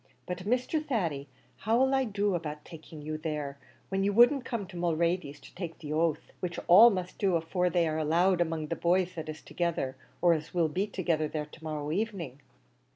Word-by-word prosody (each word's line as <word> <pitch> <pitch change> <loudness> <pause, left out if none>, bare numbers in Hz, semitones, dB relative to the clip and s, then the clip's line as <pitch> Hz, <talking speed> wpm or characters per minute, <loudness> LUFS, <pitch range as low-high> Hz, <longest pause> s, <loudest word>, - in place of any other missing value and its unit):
But, 180 -1 -4
Mr. 250 +7 0
Thady, 170 - -2 0.3
how'll 245 +5 +2
I 265 -1 +2
do 205 -2 0
about 150 -3 -4
taking 160 -2 -11
you 155 +1 -4
there, 150 -3 -4 0.3
when 195 0 0
you 200 - +2
wouldn't 245 +4 +5
come 230 -5 -3
to 185 0 -13
Mulready's 170 -3 0
to - - -15
take 175 -3 -6
the 150 -2 -6
oath, 160 -1 0
which 175 -2 -4
all 215 +7 +9
must 185 -4 -4
do 190 -3 +2
afore 180 +2 0
they'll 165 -2 +1
be - - 0
allowed 175 +4 +3
among 160 -2 -1
the 165 - -1
boys 180 +2 +1
that 160 -3 -6
is 155 0 -7
together, 170 -6 -2 0.2
or 175 -1 +5
as 155 +2 -5
will 165 -3 +3
be 190 +6 -1
together 165 -6 0
there 150 0 -3
to 155 +2 -16
morrow 150 -1 -3
evening?" 175 - -3
170 Hz, 200 wpm, -29 LUFS, 155-195 Hz, 0.3 s, all